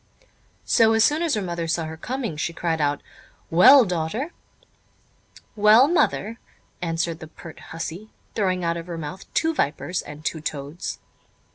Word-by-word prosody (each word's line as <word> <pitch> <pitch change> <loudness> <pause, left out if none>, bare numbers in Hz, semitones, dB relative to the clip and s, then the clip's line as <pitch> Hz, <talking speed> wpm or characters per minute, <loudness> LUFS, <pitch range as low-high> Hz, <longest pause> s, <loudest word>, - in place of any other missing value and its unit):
So 225 -1 +4
soon 295 +8 +3
as 335 -6 +1
her 210 - -2
mother 170 -2 -3
saw 165 0 -1
her 160 0 -6
coming, 240 - -4
she 160 +2 -3
cried 165 -2 -1
out: 145 -1 0 0.5
"Well, 245 +10 +8
daughter?" 180 - -3 1.2
"Well, 215 +5 +6
mother?" 230 - 0 0.4
answered 165 -1 -2
the 160 - -9
pert 160 0 -12
hussey, 165 +6 -6 0.2
throwing 185 -4 0
out 170 0 0
of 170 +1 -7
her 170 -2 -5
mouth 165 +4 -8
two 325 0 +2
vipers 175 - -1
and 150 +2 -11
two 160 - -2
toads. 145 +2 -5
175 Hz, 150 wpm, -23 LUFS, 160-220 Hz, 1.2 s, Well